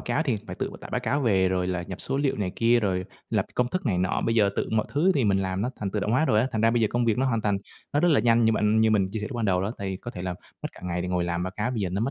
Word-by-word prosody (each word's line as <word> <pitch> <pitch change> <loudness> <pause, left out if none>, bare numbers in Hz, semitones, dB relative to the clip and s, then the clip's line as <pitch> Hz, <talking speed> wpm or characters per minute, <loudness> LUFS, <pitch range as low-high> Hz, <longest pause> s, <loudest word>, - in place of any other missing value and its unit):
cáo 120 +6 0
thì 130 -8 0
phải - - -6
tự - - -3
tải - - -10
báo - - -1
cáo 140 - 0
về 95 -7 +3
rồi 90 -1 0
là 90 -1 -2
nhập 95 0 -6
số 135 - -1
liệu 140 -1 +1
này 100 -3 -2
kia, 120 +1 +4
rồi 95 -3 0 0.3
lập - - +1
công 125 0 +1
thức 185 +2 -3
này 95 -6 +1
nọ. 90 0 0
Bây 115 - +1
giờ 105 -3 +4
tự - - -1
mọi 110 -1 +1
thứ 170 +7 +3
thì 135 -5 +2
mình 100 -2 +3
làm 95 +1 -2
nó 125 - -1
thành 100 -2 -2
tự 105 - -2
động 105 - -1
hóa 130 +6 +3
rồi 110 -8 +3
á, 125 - +1
thành 110 - -1
ra 115 +1 +4
bây 120 - +1
giờ 110 - +3
công 120 0 +1
việc 115 0 +1
nó 135 - +2
hoàn 115 -3 +1
thành 105 -2 0 0.3
nó 145 - +2
rất 175 - +4
là 145 -9 +4
nhanh. 115 0 +4
Như 110 - +4
bạn 110 0 +2
như 110 0 +4
mình 100 -3 +2
chia 110 - -4
sẻ 105 - -3
lúc 125 - -5
ban 115 - -1
đầu 90 -3 +2
đó, 105 +3 -2
tại 100 - -4
vì 95 - -3
có 120 - -8
thể 90 - -7
là 90 -1 -2 0.3
mất - - -2
cả - - -15
ngày 90 0 -2
để 90 - -3
ngồi 90 -1 0
làm 85 0 -2
báo 95 - -2
cáo 105 +4 -1
bây 120 -4 -2
giờ 95 - 0
nó 95 +3 -2
mất 120 +5 0
110 Hz, 375 wpm, -26 LUFS, 95-120 Hz, 0.3 s, kia